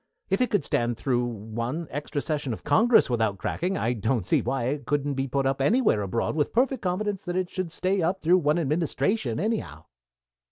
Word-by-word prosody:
If 195 Hz, -, +2 dB
it 250 Hz, -, +2 dB
could 205 Hz, -7 st, +1 dB
stand 120 Hz, -3 st, 0 dB
through 125 Hz, -2 st, 0 dB
one 115 Hz, +7 st, -4 dB
extra 145 Hz, 0 st, -3 dB
session 150 Hz, -6 st, -2 dB
of -, -, -8 dB
Congress 235 Hz, +1 st, +4 dB
without 110 Hz, -5 st, 0 dB
cracking, 185 Hz, -, -2 dB
I 120 Hz, -, 0 dB
don't 110 Hz, -2 st, -1 dB
see -, -, +2 dB
why 130 Hz, +1 st, -1 dB
it 135 Hz, +1 st, -2 dB
couldn't 145 Hz, 0 st, 0 dB
be 135 Hz, 0 st, -2 dB
put 135 Hz, +1 st, -1 dB
up 135 Hz, 0 st, 0 dB
anywhere 210 Hz, -, +3 dB
abroad 100 Hz, +8 st, -1 dB
with 150 Hz, -2 st, 0 dB
perfect 260 Hz, +3 st, +1 dB
confidence 195 Hz, +2 st, -1 dB
that 180 Hz, -1 st, -4 dB
it 185 Hz, -1 st, -2 dB
would 185 Hz, -3 st, -2 dB
stay 185 Hz, +3 st, 0 dB
up 180 Hz, +4 st, 0 dB
through 180 Hz, +2 st, +4 dB
one 150 Hz, 0 st, +2 dB
administration, 155 Hz, -, 0 dB
anyhow." 205 Hz, -, -3 dB
145 Hz, 200 wpm, -26 LUFS, 120-185 Hz, -, Congress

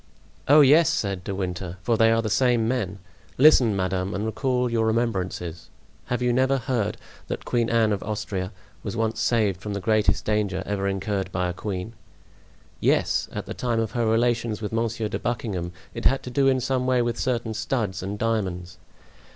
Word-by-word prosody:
"Oh, 150 Hz, +2 st, +8 dB
yes," 150 Hz, +3 st, +6 dB
said 100 Hz, -3 st, -1 dB
De 95 Hz, -, -4 dB
Winter, 90 Hz, -1 st, -4 dB
"for 115 Hz, +4 st, +2 dB
they 115 Hz, 0 st, +4 dB
are 115 Hz, 0 st, +2 dB
the 110 Hz, -, -1 dB
same 120 Hz, -3 st, +3 dB
men. 110 Hz, -6 st, -1 dB, 0.4 s
Listen, 130 Hz, -6 st, +6 dB
madame, 95 Hz, +1 st, -1 dB
and 100 Hz, +3 st, -2 dB
recall 125 Hz, +2 st, 0 dB
your 115 Hz, -2 st, +1 dB
remembrances. 95 Hz, -7 st, -2 dB, 0.4 s
Have 125 Hz, 0 st, -2 dB
you 125 Hz, -1 st, +2 dB
never 130 Hz, +2 st, +3 dB
heard 115 Hz, -4 st, -1 dB, 0.3 s
that -, -, -5 dB
Queen 120 Hz, -1 st, 0 dB
Anne 115 Hz, -2 st, +3 dB
of 100 Hz, -, -3 dB
Austria 100 Hz, -3 st, -3 dB, 0.3 s
was 105 Hz, +2 st, -5 dB
once 115 Hz, 0 st, -1 dB
saved 105 Hz, -6 st, +1 dB
from 105 Hz, 0 st, -4 dB
the -, -, -2 dB
greatest 105 Hz, 0 st, +1 dB
danger 100 Hz, -3 st, 0 dB
ever 100 Hz, -1 st, -1 dB
incurred 95 Hz, -1 st, -2 dB
by 90 Hz, 0 st, -1 dB
a -, -, -3 dB
queen?" 95 Hz, +3 st, -5 dB, 0.9 s
"Yes, -, -, +1 dB
at -, -, -5 dB
the -, -, -6 dB
time 120 Hz, -2 st, -1 dB
of 110 Hz, -1 st, -1 dB
her 115 Hz, -1 st, 0 dB
relations 115 Hz, -1 st, +1 dB
with 105 Hz, -2 st, -4 dB
Monsieur 115 Hz, -1 st, -1 dB
de -, -, -4 dB
Buckingham; 105 Hz, -7 st, -3 dB, 0.2 s
it -, -, -6 dB
had 135 Hz, -, +3 dB
to 125 Hz, -, -7 dB
do 135 Hz, +2 st, +2 dB
in 130 Hz, -1 st, +3 dB
some 130 Hz, 0 st, 0 dB
way 125 Hz, -1 st, +3 dB
with 120 Hz, 0 st, -2 dB
certain 120 Hz, -3 st, -1 dB
studs 110 Hz, -4 st, -2 dB
and 100 Hz, +2 st, -4 dB
diamonds." 95 Hz, -5 st, -2 dB
110 Hz, 190 wpm, -25 LUFS, 95-120 Hz, 0.9 s, Oh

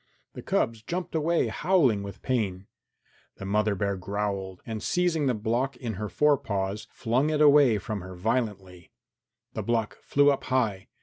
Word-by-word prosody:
The -, -, -8 dB
cubs 115 Hz, -1 st, 0 dB
jumped 175 Hz, +9 st, -4 dB
away, 160 Hz, -5 st, +1 dB
howling 135 Hz, -, +2 dB
with 100 Hz, -1 st, -9 dB
pain. 100 Hz, -7 st, -1 dB, 0.7 s
The 95 Hz, -, -8 dB
mother 105 Hz, +1 st, +1 dB
bear 100 Hz, +1 st, -1 dB
growled, 100 Hz, -1 st, -4 dB
and 110 Hz, -2 st, -5 dB
seizing 170 Hz, -, +1 dB
the 125 Hz, -, +1 dB
block 120 Hz, +5 st, -1 dB
in 120 Hz, -3 st, -4 dB
her 105 Hz, +2 st, -4 dB
fore 150 Hz, +2 st, +3 dB
paws, 100 Hz, 0 st, -3 dB
flung 125 Hz, +6 st, 0 dB
it 155 Hz, -1 st, 0 dB
away 145 Hz, -6 st, +6 dB
from 105 Hz, +1 st, -4 dB
her 90 Hz, 0 st, -9 dB
violently. 95 Hz, -3 st, -3 dB, 0.6 s
The -, -, -3 dB
block 115 Hz, -2 st, -1 dB
flew 145 Hz, 0 st, +4 dB
up 140 Hz, -, -3 dB
high. 115 Hz, -7 st, 0 dB
110 Hz, 165 wpm, -27 LUFS, 100-135 Hz, 0.7 s, away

